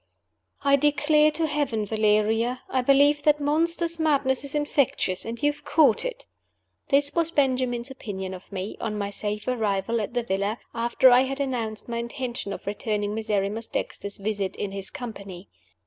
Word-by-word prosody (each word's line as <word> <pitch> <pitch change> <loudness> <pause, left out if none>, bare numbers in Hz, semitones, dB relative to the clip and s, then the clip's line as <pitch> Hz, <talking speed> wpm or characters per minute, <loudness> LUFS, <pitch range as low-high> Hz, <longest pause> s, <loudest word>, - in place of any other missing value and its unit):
"I 280 0 +5
DECLARE 295 +2 +3
to 320 +1 +6
Heaven, 290 -8 -1
Valeria, 220 +3 +1
I 260 - +2
believe 285 +3 +4
that 300 0 +3
monster's 330 +3 +2
madness 280 -4 +2
is 280 +1 -3
infectious 280 -10 0
and 230 +1 -5
you 290 - +4
have 290 - -16
caught 285 -9 +4
it!" - - -5 0.6
This 285 0 +2
was 335 -1 +2
Benjamin's 255 -4 0
opinion 190 -7 -6
of 185 +2 -11
me 195 +1 -5
(on 210 -1 -3
my 200 -1 -3
safe 210 +1 -4
arrival 225 -2 0
at 210 +4 -5
the 240 - 0
villa) 200 +1 -1 0.2
after 235 +2 +4
I 245 +1 +7
had 270 +1 -4
announced 235 -6 -3
my 235 -1 -3
intention 235 -3 -4
of - - -7
returning 205 0 -2
Miserrimus 215 0 -2
Dexter's 200 0 -4
visit, 200 -1 -3
in 200 - -4
his 195 -1 -4
company. 200 -8 -8
235 Hz, 165 wpm, -25 LUFS, 210-285 Hz, 0.6 s, I